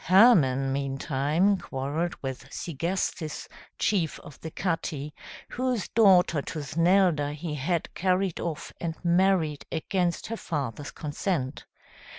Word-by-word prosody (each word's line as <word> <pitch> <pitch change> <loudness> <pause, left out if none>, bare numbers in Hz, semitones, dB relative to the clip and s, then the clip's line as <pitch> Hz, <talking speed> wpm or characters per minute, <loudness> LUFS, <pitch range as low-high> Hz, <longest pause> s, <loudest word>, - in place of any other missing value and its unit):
Hermann 150 - +5
meantime 140 +7 +1
quarrelled 145 +6 -2
with 130 -1 -5
Segestes, 170 0 -3 0.3
chief 180 -7 +1
of 150 -3 -13
the 160 - -5
Catti, 155 -4 -2 0.4
whose 250 -5 -1
daughter 185 -8 +5
Tusnelda, 165 0 +2
he 155 +1 -5
had 160 +4 -1
carried 185 -1 +1
off 165 -3 -4
and 165 -2 -2
married 170 -4 +3
against 175 +1 -1
her 230 - -4
father's 145 - -4
consent. 150 -2 -3
165 Hz, 110 wpm, -27 LUFS, 145-185 Hz, 0.4 s, Hermann